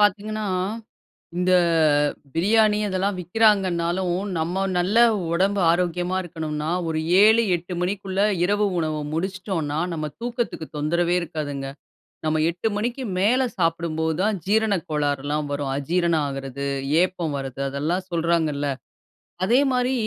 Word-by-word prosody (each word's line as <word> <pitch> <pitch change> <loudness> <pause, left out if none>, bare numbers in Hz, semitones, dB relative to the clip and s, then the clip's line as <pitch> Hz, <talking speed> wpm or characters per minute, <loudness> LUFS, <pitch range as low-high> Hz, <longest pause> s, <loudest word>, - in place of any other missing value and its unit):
பார்த்தீங்கன்னா, 210 +1 +1 0.9
இந்த 185 +1 +2 0.8
பிரியாணி 210 +5 +3
இதெல்லாம் 190 +1 -1
விக்கிறாங்கன்னாலும், 180 -2 +2 0.3
நம்ம 175 +4 -1
நல்ல 185 +6 +1 0.4
உடம்பு 195 +3 +1
ஆரோக்கியமா 175 +1 0
இருக்கணும்னா, 155 -2 -4 0.2
ஒரு 160 -1 -1 0.2
7 220 +2 +6
8 175 +2 -6
மணிக்குள்ள 195 +1 -1 0.2
இரவு 205 +3 +2
உணவ 155 -1 -1 0.2
முடிச்சுட்டோம்னா, 175 -3 -2
நம்ம 155 -2 -3
தூக்கத்துக்கு 240 -9 -3
தொந்தரவே 170 +4 +1
இருக்காதுங்க. 150 -4 -4 0.6
நம்ம 155 0 +1
8 175 +6 -2
மணிக்கு 240 +5 -2 0.2
மேலே 245 +7 +3
சாப்பிடும்போது 165 -2 0
தான் 210 0 +1
ஜீரண 215 +1 +2 0.2
கோளாறுலாம் 145 0 -1
வரும். 140 -1 -2
அஜீரணம் 165 +1 +1
ஆகுறது, 135 0 -5 0.4
ஏப்பம் 175 -5 -1
வர்றது 135 0 -5
அதெல்லாம் 160 +7 -2
சொல்றாங்கல்ல. 160 -4 0 0.8
அதேமாதிரி 250 +3 +2
175 Hz, 110 wpm, -23 LUFS, 155-200 Hz, 0.9 s, 7